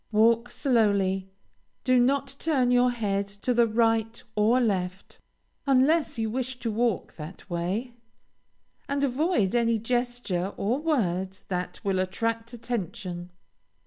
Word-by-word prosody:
Walk 230 +2 +4
slowly, 200 -8 +1 0.5
do 255 -1 +4
not 275 +2 +1
turn 265 -6 +2
your 250 0 +5
head 200 -4 -1
to 200 +5 -2
the 235 -1 +4
right 225 0 +1
or 220 +4 +4
left, 190 -5 -2 0.5
unless 275 +3 +3
you 225 -1 0
wish 255 +3 -3
to 230 - -1
walk 225 -2 -1
that 155 +4 -9
way, 190 +9 -2 1.0
and 280 0 0
avoid 275 - +1
any 230 -1 +3
gesture 240 -5 -1
or 230 +7 0
word 190 - 0
that 180 -1 -3
will 195 -2 +1
attract 230 +5 -2
attention. 195 -6 -5
230 Hz, 125 wpm, -27 LUFS, 195-250 Hz, 1.0 s, your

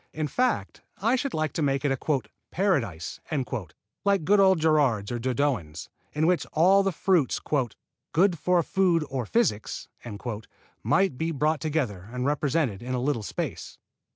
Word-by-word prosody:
In 155 -1 -1
fact, 245 - -1 0.2
I 230 +6 +2
should 270 0 -2
like 155 0 -1
to 165 - -2
make 140 0 +1
it 140 - +2
a 135 +1 0 0.3
"Paradise" 130 - -1 0.8
like 200 -5 +2
good 205 +4 +4
old 190 -3 +5
Gerarde's 145 -10 +2
or 120 - -2
Dodoens', 125 - -1 0.2
in 155 +1 +1
which 180 +1 +2
all 185 +5 +5
the 195 0 +1
fruits 175 -5 +1 0.7
"good 175 0 +3
for 180 +1 +2
food 175 -4 +2
or 130 -5 -2
physic" 195 - +1 1.2
might 190 -9 +2
be 160 - 0
brought 155 -1 0
together 125 - -2
and 125 0 -3
represented 145 -6 0
in 130 +1 -3
a - - -1
little 130 -2 0
space. 105 - -5
155 Hz, 155 wpm, -26 LUFS, 125-180 Hz, 1.2 s, old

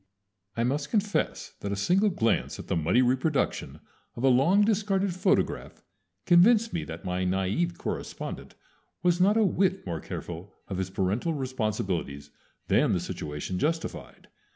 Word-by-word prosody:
I 115 - +1
must 140 +4 -1
confess 210 -1 -1
that 100 - -4
a - - 0
single 185 - +2
glance 115 - 0
at - - -8
the - - -1
muddy 85 +10 +3
reproduction 130 +4 0 0.3
of 120 - -6
a 135 - +5
long 160 +11 +4
discarded 200 -3 +1
photograph 185 +3 0 0.4
convinced 210 +5 +5
me 170 - -1
that - - -8
my 90 0 -1
naïve 95 - 0
correspondent - - -5 0.5
was 175 0 +3
not 205 +4 +4
a 225 - +4
whit 190 0 +1
more 85 -3 -3
careful 85 +5 -7
of 95 -2 -4
his 95 -1 -2
parental 100 - -1
responsibilities 100 - -3 0.4
than - - +3
the - - +1
situation 75 +5 -4
justified. 165 +2 -3
130 Hz, 150 wpm, -27 LUFS, -, 0.5 s, a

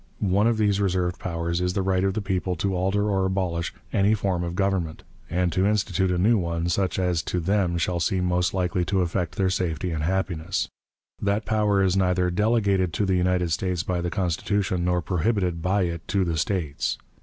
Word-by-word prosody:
One 105 +3 +4
of 115 -1 +2
these 100 -2 +2
reserved 90 -2 0
powers 85 0 -2
is 90 0 0
the 95 - 0
right 95 -1 +1
of 95 0 0
the 110 - -2
people 95 -1 -1
to 95 +3 -1
alter 95 +3 +1
or 95 -2 +1
abolish 90 -3 -1 0.2
any 105 +1 +3
form 95 -4 -1
of 85 0 -4
government, 95 -5 -1 0.3
and 90 +1 +1
to 95 +3 +2
institute 95 -3 +1
a 90 - +1
new 105 +5 +3
one 85 -1 -2
such 95 +2 0
as 90 -3 +1
to 90 - -2
them 90 0 +1
shall 85 +1 0
seem 90 +2 0
most 90 0 +1
likely 90 -1 0
to 95 0 +1
effect 85 -1 -2
their 95 -1 +1
safety 90 -2 -1
and 80 -2 -2
happiness; 90 0 -1 0.5
that 100 +2 0
power 105 -2 +2
is 95 -1 +2
neither 90 -1 +2
"delegated 100 -3 +1
to 105 - 0
the 95 -1 +1
United 90 -1 +1
States 90 +1 -1
by 90 -2 -1
the 85 - -1
Constitution 90 0 -1
nor 90 -1 +1
prohibited 90 -2 0
by 95 +3 +1
it 85 -2 -4
to 100 -2 +1
the 85 -2 -1
States." 80 -5 -1
90 Hz, 200 wpm, -25 LUFS, 85-100 Hz, 0.5 s, One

